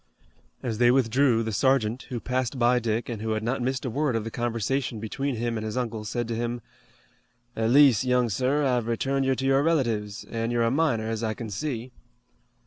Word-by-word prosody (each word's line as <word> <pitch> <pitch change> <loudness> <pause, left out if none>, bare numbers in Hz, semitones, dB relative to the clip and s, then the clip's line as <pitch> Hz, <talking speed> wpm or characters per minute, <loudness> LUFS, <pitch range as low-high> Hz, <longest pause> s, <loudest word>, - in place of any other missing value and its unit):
As 115 -3 -3
they 120 0 +5
withdrew 125 -1 +3
the 110 - -3
sergeant, 125 +1 +1
who 125 -3 -3
passed 130 +1 -2
by 125 0 +3
Dick 115 0 -1
and 115 -4 -5
who 110 0 -1
had 110 0 -2
not 120 +3 -1
missed 130 +2 -2
a - - -1
word 140 0 0
of 115 - -1
the 115 - -6
conversation 120 +1 -2
between 135 +5 -3
him 115 0 -2
and - - -5
his 110 +3 -4
uncle, 115 -4 -3
said 120 +2 -2
to 115 - -1
him: 120 0 -3 0.9
"At 110 0 0
least, 135 -4 +6
young 125 -1 +2
sir, 130 +7 +1
I've 125 -3 +1
returned 135 +4 0
you 130 0 +2
to 135 - -3
your 135 0 +4
relatives, 115 -10 0
an' 115 0 -3
you're 120 -1 +1
a 115 - +2
minor, 130 -7 +1
as 115 0 -2
I 110 -1 -1
can 115 -3 -6
see." 125 +1 -4
120 Hz, 215 wpm, -26 LUFS, 115-130 Hz, 0.9 s, least